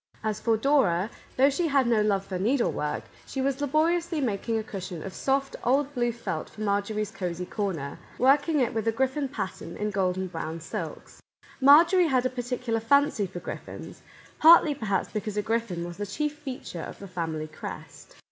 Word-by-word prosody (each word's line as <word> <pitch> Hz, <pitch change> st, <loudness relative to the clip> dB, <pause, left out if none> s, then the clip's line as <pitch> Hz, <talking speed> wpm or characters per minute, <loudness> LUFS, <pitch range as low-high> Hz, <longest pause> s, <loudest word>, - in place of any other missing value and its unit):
As 215 Hz, -1 st, -1 dB
for 225 Hz, -2 st, +2 dB
Dora, 220 Hz, -7 st, +2 dB, 0.3 s
though 275 Hz, +2 st, +5 dB
she 335 Hz, +5 st, 0 dB
had 275 Hz, -3 st, +3 dB
no 230 Hz, -2 st, +3 dB
love 200 Hz, -2 st, +1 dB
for 185 Hz, -2 st, -4 dB
needlework, 220 Hz, -, 0 dB, 0.2 s
she 270 Hz, -, -5 dB
was 275 Hz, +1 st, 0 dB
laboriously 325 Hz, +3 st, +1 dB
mak 230 Hz, -5 st, -2 dB
ing 225 Hz, -, +2 dB
a 220 Hz, -, -2 dB
cushion 185 Hz, -5 st, -6 dB
of 190 Hz, -, -6 dB
soft, 275 Hz, 0 st, 0 dB
old 280 Hz, +3 st, +2 dB
blue 240 Hz, -2 st, +1 dB
felt 225 Hz, -9 st, -4 dB
for 215 Hz, -, -11 dB
Mar 200 Hz, -1 st, +2 dB
jorie's 215 Hz, 0 st, -3 dB
cosey 180 Hz, -3 st, -4 dB
corner, 175 Hz, -9 st, -3 dB, 0.2 s
working 285 Hz, +4 st, +4 dB
it 250 Hz, -, +1 dB
with 225 Hz, -1 st, -2 dB
a -, -, +4 dB
griffin 265 Hz, +4 st, 0 dB
pattern 210 Hz, -8 st, -5 dB
in 210 Hz, 0 st, -2 dB
golden 190 Hz, -1 st, 0 dB
brown 165 Hz, -2 st, -5 dB
silks. 160 Hz, -, -7 dB, 0.4 s
Marjorie 335 Hz, +6 st, +7 dB
had 255 Hz, -4 st, +2 dB
a 255 Hz, -, +1 dB
particular 245 Hz, -2 st, -2 dB
fancy 225 Hz, -3 st, +3 dB
for 175 Hz, -1 st, -7 dB
griffins, -, -, -8 dB, 0.2 s
— -, -, -25 dB
partly, 320 Hz, -1 st, +8 dB
per 235 Hz, -6 st, -6 dB
haps, 195 Hz, -1 st, 0 dB
because 210 Hz, 0 st, -3 dB
a 210 Hz, -, +1 dB
griffin 225 Hz, -6 st, -1 dB
was 175 Hz, 0 st, -8 dB
the 205 Hz, 0 st, -4 dB
chief 300 Hz, +6 st, -2 dB
feature 255 Hz, -, -7 dB
of -, -, -7 dB
the 200 Hz, -, -9 dB
family 165 Hz, -4 st, -3 dB
crest. 155 Hz, -, -9 dB
225 Hz, 195 wpm, -27 LUFS, 195-275 Hz, 0.4 s, partly